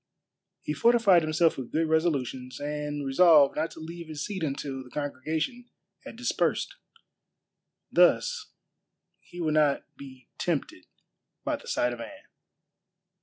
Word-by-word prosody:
He 150 - -2
fortified 225 -1 +5
himself 155 +1 +2
with 125 - -7
good 160 +1 +1
resolutions, 140 -6 -1
and 150 0 -3
resolved 145 0 +6
not 160 +2 -1
to - - -12
leave 165 +1 -8
his 155 -1 -5
seat 195 -3 -5
until 140 -3 -3
the 125 - -15
congregation 155 - -3 0.4
had - - -9
dispersed. - - -1 1.2
Thus 485 -3 +3 0.7
he 175 - -13
would 155 -3 0
not 150 -2 +3
be 130 -3 -12
tempted 145 - -2 0.6
by - - -1
the - - -15
sight 120 0 0
of 120 - -7
Anne. - - -10
155 Hz, 130 wpm, -28 LUFS, 140-170 Hz, 1.2 s, resolved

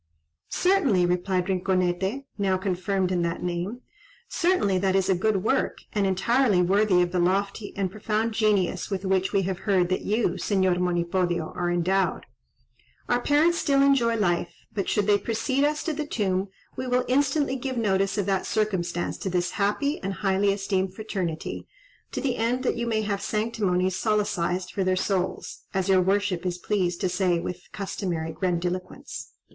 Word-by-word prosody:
"Certainly," 290 - +3
replied 180 +1 0
Rinconete 190 +5 0
(now 195 -3 +1
confirmed 185 0 -1
in 180 -1 +1
that 170 0 -2
name), 180 +7 -3 0.5
"certainly 335 - +1
that 190 0 +1
is 190 0 +2
a - - +5
good 195 +1 +1
work, - - +1 0.2
and 205 -2 +1
entirely 205 +2 +2
worthy 185 0 +4
of 175 - -2
the 180 - 0
lofty 200 +3 0
and 190 -2 -1
profound 215 +2 -1
genius 205 -5 +1
with 195 -1 -3
which 190 0 +1
we 195 -2 +2
have 190 0 -2
heard 185 -4 +2
that 185 - 0
you, 220 +3 +1
Señor 190 -3 +1
Monipodio, 175 -1 0
are 175 -1 -1
endowed. 185 +2 +1 0.8
Our 245 0 +2
parents 310 +6 +3
still 275 -3 +3
enjoy 255 -5 +3
life; 175 -5 0 0.2
but 200 -3 -2
should 210 - +1
they 205 0 +4
precede 260 +6 0
us 300 +1 +1
to 320 - -1
the 300 0 -4
tomb, 190 -6 0 0.3
we 255 - -4
will 250 0 +1
instantly 280 +1 +2
give 260 0 -4
notice 195 -2 +1
of 205 - 0
that 195 -1 0
circumstance 180 -5 -1
to 190 - -3
this 180 -1 0
happy 210 +9 0
and 195 +1 -2
highly 195 0 +1
esteemed 195 -1 -1
fraternity, 190 -7 -4 0.4
to - - -3
the 260 -3 -1
end 240 +3 0
that - - +1
you 235 0 -2
may 220 -2 0
have 200 -1 -2
'sanctimonies 195 -4 0
solecised' 190 -4 0
for 195 - 0
their 185 0 +2
souls, 185 -1 -2 0.2
as 190 0 0
your 190 -1 +5
worship 195 -1 +1
is 180 -1 -2
pleased 180 -2 -1
to 190 - +2
say, 180 -1 +1
with 175 +1 -4
the - - -24
customary 175 -5 -3
'grandiloquence.'" 180 +1 -3
195 Hz, 175 wpm, -26 LUFS, 180-220 Hz, 0.8 s, a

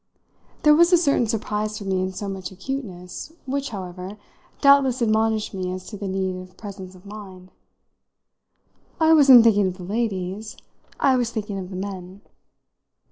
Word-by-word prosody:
There 300 -1 +7
was 340 +3 +5
a 355 - +7
certain 280 -8 +2
surprise 215 -1 -2
for 205 - -7
me 190 -1 -1
in 185 0 -2
so 200 +2 -6
much 190 -2 -5
acuteness, 190 - -7
which, 275 +1 -2
however, 185 0 -7 0.4
doubtless 280 -3 +5
admonished 220 -2 +1
me 185 -1 -3
as 185 0 -6
to 215 - -8
the 200 -1 -5
need 190 -1 -2
of 185 0 -15
presence 195 -3 -9
of 185 +2 -17
mind. 190 -3 -11 1.5
"I 320 0 +5
wasn't 270 -6 +8
thinking 205 -4 +4
of 185 0 -4
the 180 - -9
ladies 205 0 -3 0.4
I 265 -2 +4
was 240 -2 0
thinking 210 -3 -4
of 185 -1 -7
the 190 - -8
men." 190 0 -7
205 Hz, 165 wpm, -23 LUFS, 185-235 Hz, 1.5 s, wasn't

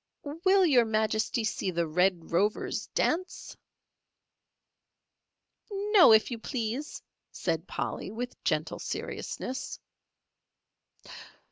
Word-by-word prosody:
"Will 365 +6 +2
Your 260 -7 +5
Majesty 220 +1 0
see 205 -2 -1
the 170 -1 0
Red 180 +1 +1
Rover's 200 +5 0
dance?" 365 +3 -2 2.2
"No, 400 - +5
if 220 +3 +5
you 235 - -4
please," 245 +4 -4 0.3
said 165 0 -2
Polly, - - -4
with 245 +4 -6
gentle - - -1
seriousness. 260 +2 -5
225 Hz, 90 wpm, -29 LUFS, 195-295 Hz, 2.2 s, Your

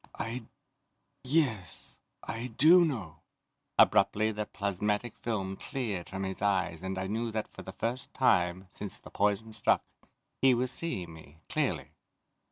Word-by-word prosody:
"I... 115 +1 -4 0.8
Yes, 130 - -1 0.2
I 115 +2 -4
do 155 +9 +6
know!" 115 - -2 0.6
Abruptly 110 +1 +5
the 105 0 -3
plasmatic 105 +3 -1
film 95 -5 -2
cleared 105 -10 -4
from 95 0 -4
his 95 0 -4
eyes 95 -5 +1
and 95 0 -3
I 95 - -2
knew 115 +4 -1
that 110 -1 -2
for - - -11
the - - -8
first 120 +2 -3
time, 90 -7 +2
since 100 -3 -6
the - - -14
poison 105 +2 +1
struck, 105 - +2 0.6
he 130 -2 +6
was 125 +1 0
seeing 95 - -2
me, 80 0 -15
clearly. - - -1
105 Hz, 145 wpm, -30 LUFS, 95-120 Hz, 0.8 s, do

